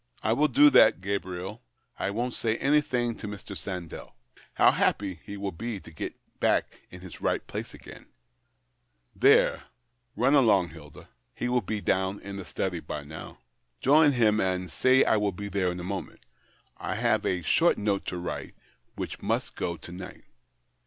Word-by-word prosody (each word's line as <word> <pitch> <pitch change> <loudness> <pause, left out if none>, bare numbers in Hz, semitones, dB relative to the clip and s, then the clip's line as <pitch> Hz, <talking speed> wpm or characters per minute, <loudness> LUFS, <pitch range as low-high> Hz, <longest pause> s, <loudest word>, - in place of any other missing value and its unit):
" - - -29
I - - +4
will 150 +5 +3
do 145 +2 +6
that, 110 - +6
Gabriel. 95 +1 -4 0.4
I - - -1
won't 120 +4 -2
say 115 -1 -1
anything 130 -5 +1
to 105 - -7
Mr. 100 -1 -8
Sandell. 90 -4 -7 0.4
How - - +6
happy 95 -4 0
he 100 - -8
will 100 0 -3
be 110 +4 -5
to 80 - -14
get 80 - -6 0.2
back - - +3 0.2
in 90 - -11
his 95 -1 -11
right - - 0
place - - -6
again! - - -13 0.6
" - - -46
''There, - - +5 0.5
run 125 +6 +3
along, 105 -11 +4
Hilda. 75 -2 -13 0.3
He 120 - -2
will 125 0 +2
be 105 +2 -3
down 95 +1 0
in 100 0 -7
the 95 - -7
study 90 -2 -3
by 75 -1 -6
now. 80 +2 -9 0.4
Join 145 +2 +5
him, 110 -4 +3
and 90 -2 -1
say 130 - +4
I 110 - +3
will 105 -1 +1
be 100 +3 -6
there 95 -2 0
in 90 - -6
a - - -6
moment. 95 -3 -5 0.6
I - - -4
have - - +1
a 90 -2 -1
short 170 - +3
note 100 -2 0
to 90 - -3
write, 90 - -5 0.4
which - - -6
must - - -2
go 85 -1 -3
to 85 - -11
night." 90 +1 -9
100 Hz, 180 wpm, -27 LUFS, 90-115 Hz, 0.6 s, do